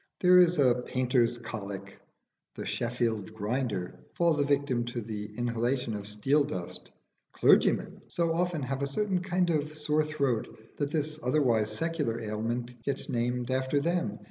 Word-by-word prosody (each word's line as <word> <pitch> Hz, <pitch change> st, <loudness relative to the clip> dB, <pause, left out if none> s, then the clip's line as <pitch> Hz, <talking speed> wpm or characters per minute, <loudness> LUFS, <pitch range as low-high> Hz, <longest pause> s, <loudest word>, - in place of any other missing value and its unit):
There 180 Hz, 0 st, +7 dB
is 175 Hz, -1 st, +5 dB
a 130 Hz, -4 st, +5 dB
painter's 125 Hz, -2 st, +1 dB
colic: 100 Hz, -4 st, -7 dB, 0.6 s
the -, -, -5 dB
Sheffield 115 Hz, -3 st, -2 dB
grinder 105 Hz, -4 st, -2 dB, 0.2 s
falls 170 Hz, -3 st, +2 dB
a -, -, +4 dB
victim 140 Hz, -4 st, +1 dB
to 120 Hz, 0 st, -4 dB
the 105 Hz, -2 st, -5 dB
inhalation 120 Hz, 0 st, 0 dB
of 105 Hz, -1 st, -5 dB
steel 135 Hz, +8 st, +2 dB
dust: 90 Hz, -11 st, -6 dB, 0.4 s
clergymen -, -, +3 dB
so 170 Hz, -1 st, 0 dB
often 175 Hz, -3 st, 0 dB
have 135 Hz, +1 st, -3 dB
a 140 Hz, -, +1 dB
certain 190 Hz, +6 st, 0 dB
kind 180 Hz, -1 st, +1 dB
of 155 Hz, -1 st, -1 dB
sore 150 Hz, 0 st, +1 dB
throat 140 Hz, -7 st, 0 dB, 0.3 s
that 145 Hz, -1 st, -1 dB
this 155 Hz, 0 st, -2 dB
otherwise 125 Hz, -6 st, +2 dB
secular 165 Hz, -8 st, -1 dB
ailment 115 Hz, +3 st, -3 dB
gets 140 Hz, +5 st, -3 dB
named 125 Hz, 0 st, -1 dB
after 130 Hz, +2 st, +1 dB
them. 170 Hz, +4 st, -1 dB
130 Hz, 150 wpm, -29 LUFS, 115-155 Hz, 0.6 s, There